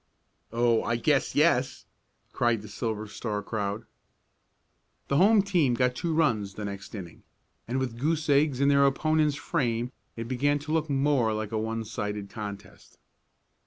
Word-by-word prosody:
"Oh, 115 0 +2
I 120 - -1
guess 135 +4 +1
yes!" 135 -4 +2 0.5
cried 120 -3 +1
the - - -9
Silver 110 0 -3
Star 105 0 -4
crowd. 105 +1 -3 1.2
The 140 - +2
home 205 +4 +5
team 170 -11 +2
got 125 +1 +2
two 165 +7 -2
runs 115 - +1
the 105 - -5
next 100 +1 -7
inning, 90 -5 -9 0.5
and 125 +3 -1
with 125 -3 -3
goose 155 +3 0
eggs 140 -2 +3
in 140 - +3
their 140 0 +5
opponents' 155 +1 +2
frame 120 -4 -1 0.2
it 115 0 -5
began 145 +4 +1
to 145 +1 -7
look 160 -1 0
more 135 -5 +2
like 110 0 -4
a 110 - -1
one 110 +1 -3
sided 105 -2 -4
contest. 100 -3 -9
120 Hz, 160 wpm, -27 LUFS, 110-145 Hz, 1.2 s, home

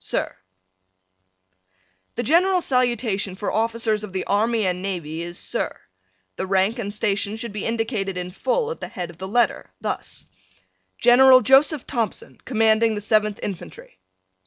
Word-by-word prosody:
Sir: - - -2 1.8
The 240 - -2
general 360 - +3
salutation 235 - 0
for 200 +2 -3
Officers 225 -1 0
of 200 -3 -8
the 190 - -2
Army 220 +1 +1
and 180 -1 -1
Navy 170 -5 -4
is 175 0 -6
Sir. - - -3 0.6
The 190 - -3
rank 195 +5 +1
and 205 -3 -3
station 205 -1 -1
should 225 -1 -6
be 210 - -3
indicated 225 -4 -2
in 180 0 -4
full 445 - -1
at 485 - -6
the - - -5
head 175 -2 -6
of 170 - -20
the 190 - -5
letter, 240 +4 +1
thus: - - -5 0.7
General 255 +1 +7
Joseph 270 +2 +4
Thompson, 230 -7 -4
Commanding 225 -2 +3
the - - -3
Seventh 215 0 +1
Infantry. 175 - -8
215 Hz, 150 wpm, -22 LUFS, 195-240 Hz, 1.8 s, General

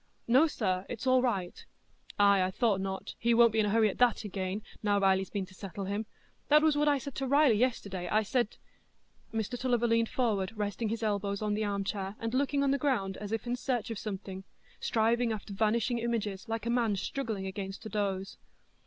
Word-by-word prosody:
"No, 260 +7 +5
sir, 190 -10 -1
it's 245 +1 -5
all 255 0 +4
right." 195 -8 -2 0.5
"Ay, 200 -1 +5
I 185 - +1
thought 200 -1 +1
not; 190 0 -4
he 235 0 +3
won't 235 -1 +6
be 220 - +1
in 210 - +3
a - - +1
hurry 220 +1 +4
at 200 - -4
that 245 -2 +3
again, 195 0 -3 0.2
now 205 -1 +2
Riley's 190 -1 +2
been 200 -2 -3
to 185 - -17
settle 195 +1 -6
him. 205 +3 -3 0.4
That 300 +1 +6
was 310 -2 +4
what 295 +1 +2
I 290 -1 +4
said 275 +1 -7
to 270 - -2
Riley 280 -1 +5
yesterday—I 210 -4 0
said——" 240 +1 -1 0.7
Mr 225 +2 -3
Tulliver 245 -2 +1
leaned 230 0 +2
forward, 210 -6 0
resting 210 +2 -2
his 225 +1 -3
elbows 200 -1 -1
on 210 -1 0
the 215 +1 0
armchair, 200 0 -2
and 230 +1 -3
looking 280 +1 +1
on 275 - +2
the 280 - +1
ground 230 -9 0
as 210 0 -6
if 225 0 -2
in 240 0 -1
search 250 -2 -2
of 220 - -4
something, 195 -2 -6 0.4
striving 230 +1 +1
after 210 -1 -5
vanishing 225 +4 +1
images 225 -4 -2
like 225 0 -3
a 235 - 0
man 235 -4 +2
struggling 215 -1 -3
against 195 +2 -6
a - - -5
doze. 195 -2 -2
220 Hz, 205 wpm, -30 LUFS, 195-240 Hz, 0.7 s, won't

